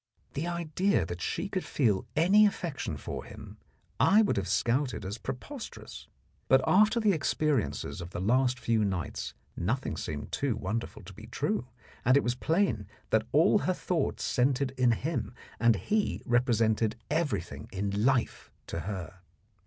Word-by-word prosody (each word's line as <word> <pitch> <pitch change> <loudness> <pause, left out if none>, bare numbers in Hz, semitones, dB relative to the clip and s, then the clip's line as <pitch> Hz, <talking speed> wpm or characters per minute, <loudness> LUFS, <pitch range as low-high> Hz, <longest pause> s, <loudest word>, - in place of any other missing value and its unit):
The 155 +5 -2
idea 170 - 0
that 85 +1 -6
she 190 - -2
could 190 -2 -2
feel 110 -7 +1
any 195 +7 +6
affection 170 -8 -3
for - - -6
him - - -11 0.4
I 215 +3 +6
would 205 - +1
have 95 -2 -1
scouted 120 +3 0
as 100 +4 -5
preposterous; 235 - -7 0.4
but - - +6
after 215 +5 +4
the 215 -2 +3
experiences 150 - 0
of 85 - -7
the 85 - -5
last 125 +6 +2
few 115 -2 +1
nights 95 -5 -3 0.2
nothing 110 +2 -1
seemed 75 -1 -5
too 140 -5 0
wonderful 110 +1 -4
to 95 +3 -11
be 110 +4 -12
true, 140 - -2 0.4
and 130 +3 +5
it - - +2
was 120 - +1
plain 130 - 0 0.2
that - - +2
all - - +5
her - - 0
thoughts - - -1
centred 130 +1 +1
in 125 -3 +3
him 150 +1 -3 0.2
and 115 -1 +5
he 205 - -1
represented 115 -3 +2 0.2
everything 155 0 -2
in 100 +1 -1
life 130 -1 +1 0.2
to - - -4
her. 95 0 -6
125 Hz, 155 wpm, -29 LUFS, 105-155 Hz, 0.4 s, any